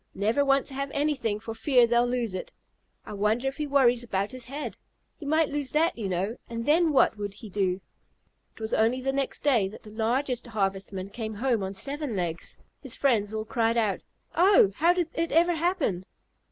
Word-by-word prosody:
Never 220 +8 +2
want 275 -1 +3
to 275 - -7
have 275 +1 -3
anything 280 -8 0
for 225 +1 -6
fear 245 +2 +4
they'll 240 +1 +2
lose 240 -4 -1
it. 185 - -5 0.5
I - - -7
wonder 215 +5 +1
if 270 - -3
he 300 -1 -2
worries 255 -4 +4
about 200 -4 -2
his 255 -2 -8
head? 280 +4 -5 0.4
He 295 - -9
might 315 +1 +2
lose 285 -2 -2
that, 325 +3 +3
you 210 -4 -4
know, 190 +6 -2
and 230 0 -4
then 325 +2 +4
what 265 -5 +3
would 205 -1 -4
he 215 0 -10
do?" 190 -1 0 0.7
It - - -16
was 220 0 -3
only 230 +4 +2
the 270 +1 -1
next 275 0 -2
day 245 -9 +3
that 205 - -11
the 210 - -11
largest 245 +3 -1
Harvestman 195 -2 -2
came 220 -1 -5
home 235 0 0
on 190 +1 -4
seven 280 +3 -3
legs. 170 -3 -4 0.2
His 265 -5 -5
friends 220 -7 +2
all 220 0 -3
cried 230 0 +1
out, 215 -4 +1 0.3
"Oh, 360 - +5
how 335 +3 +5
did 355 -2 0
it 330 0 -1
ever 340 +3 +4
happen?" 325 - 0
240 Hz, 205 wpm, -27 LUFS, 210-285 Hz, 0.7 s, Oh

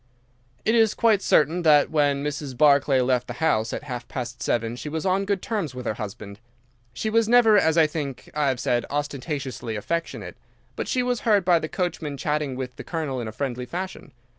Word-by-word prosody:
"It 220 - +3
is 225 -2 +4
quite 220 -4 +3
certain 160 +2 +3
that 150 -3 +5
when 145 -2 +2
Mrs. 145 -3 -4
Barclay 140 -2 +4
left 125 -1 +1
the 120 - -5
house 115 -6 +1
at - - -4
half 125 -4 -6
past 125 -1 -6
seven 115 0 -1
she 150 - -6
was 160 +3 -4
on 190 +1 +1
good 200 -2 -1
terms 190 - -3
with 125 0 -7
her - - 0
husband. 100 -1 -8 0.5
She 215 - -3
was 225 0 +2
never, 235 -3 +6
as 160 -5 +3
I 160 - +6
think 145 -4 -5
I 150 -1 +1
have 130 -2 0
said, 120 -1 +1
ostentatiously 140 -5 -4
affectionate, 165 +11 -4 0.4
but - - -4
she 250 - +1
was 245 -1 0
heard 205 -5 +2
by 175 -2 +5
the 155 - -5
coachman 165 -6 -3
chatting 150 -2 -1
with 125 -1 -6
the - - -7
Colonel 150 -7 -3
in 115 - -5
a - - -5
friendly 125 +1 -4
fashion. 185 +6 -6
145 Hz, 205 wpm, -24 LUFS, 125-175 Hz, 0.5 s, never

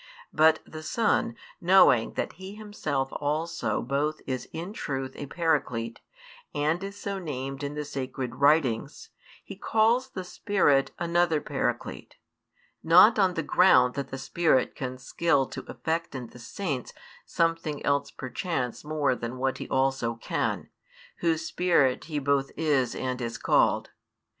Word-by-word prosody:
But 155 +1 +5
[the 155 - -9
Son] 230 +6 +1 0.3
knowing 175 -10 +5
that - - -3
He 190 +3 -9
Himself 155 -11 -3
also 155 +3 -2
both 145 +5 -1
is 130 -1 -4
in 175 +5 -6
truth 135 -7 -4
a 145 - -6
Paraclete 125 -8 -1 0.5
and 155 +5 0
is 200 +1 -6
so 200 -1 -4
named 135 -4 -5
in 145 +1 -4
the 150 0 -3
Sacred 130 -3 -4
Writings, 140 - +1 0.3
He - - -9
calls 230 +4 +2
the 190 -7 -6
Spirit 175 -8 +2
another 170 -2 +2
Paraclete; - - -3 0.7
not 185 +7 +7
on 185 -2 +3
the 165 - -1
ground 130 -7 +5
that 140 -1 -4
the 135 - -5
Spirit 155 -2 +1
can 130 -1 -5
skill 140 +1 +1
to - - -7
effect 165 -1 -3
in 130 -2 -5
the 125 - -14
Saints 135 +2 -4 0.3
something 165 -3 -1
else 140 0 +1
perchance 130 -1 -4
more 150 -3 +1
than 120 +1 -5
what 130 +1 -1
He - - -6
also 130 -3 +1
can, 115 - -2 0.5
Whose 165 -1 0
Spirit 170 -8 +2
He 155 -1 -4
both 140 -1 +1
is 145 -6 +1
and 130 -1 -3
is 115 -1 -3
called. - - +2
150 Hz, 145 wpm, -27 LUFS, 130-170 Hz, 0.7 s, not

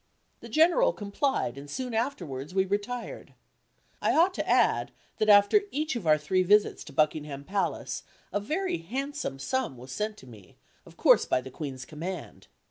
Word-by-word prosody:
The 235 - -11
General 355 - +4
complied, 200 - -1
and 145 +1 -11
soon 250 - -4
afterwards 180 - -3
we 190 0 +3
retired. 205 +5 -4 0.7
I - - +2
ought 350 +4 +4
to - - -3
add, - - +3 0.3
that 215 - +2
after 205 - +7
each 305 -3 -2
of 210 -9 -4
our 155 0 +6
three 150 +5 +1
visits 205 +3 +3
to - - -10
Buckingham 150 -1 0
Palace, 195 +5 -2 0.3
a 205 - +1
very 315 - -2
handsome 270 - -4
sum 140 - -2
was 130 +2 -10
sent 210 +8 -3
to - - -14
me, 110 -7 -15 0.3
of - - -16
course - - +5
by - - +1
the 130 +1 -9
Queen's 130 -3 -6
command. 170 +7 -7
200 Hz, 170 wpm, -28 LUFS, -, 0.7 s, after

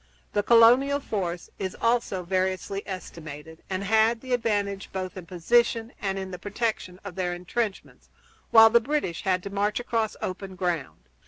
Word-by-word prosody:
The 205 - +2
colonial 245 +6 +6
force 180 -9 -4
is 190 -2 -4
also 230 -5 +1
variously 185 +2 -1
estimated, 160 -4 -8
and 190 0 -2
had 220 +3 +3
the 255 -1 -3
advantage 205 -4 -1
both 185 -1 -4
in 180 -3 -9
position 230 +6 +1
and 195 -1 -1
in 190 -1 -5
the 180 - -7
protection 205 -3 -3
of 200 -2 -7
their 180 -1 -2
intrenchments, 195 +4 -4 0.4
while 225 0 +8
the 235 +1 +5
British 260 - -2
had 185 -1 +1
to 200 - -6
march 205 +2 0
across 230 -3 -1
open 190 0 -5
ground. 175 -6 -2
195 Hz, 160 wpm, -26 LUFS, 185-225 Hz, 0.4 s, while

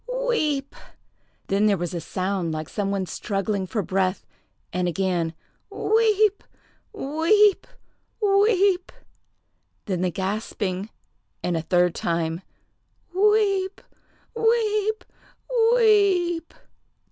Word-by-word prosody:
weep!" 300 - -1 0.7
Then 200 +2 +2
there 200 -2 +3
was 175 +1 -4
a 170 - -3
sound 185 0 -2
like 155 -1 -5
some 200 -1 -2
one 195 -1 -1
struggling 195 +2 -2
for 210 +1 -2
breath, 185 +1 -1 0.5
and 180 0 0
again 175 -2 -1 0.3
"Weep! 430 -2 +2 0.5
weep! 395 +4 +2 0.5
weep!" 395 -3 +3 0.9
Then 185 -4 -2
the 185 - +1
gasping, 195 +1 -3 0.5
and 175 -1 0
a 165 - 0
third 180 +1 +2
time, 165 0 -2 0.7
"Weep! 395 -1 +2 0.6
weep! 435 -2 +1 0.7
weep!" 385 -7 +3
220 Hz, 95 wpm, -24 LUFS, -, 0.9 s, there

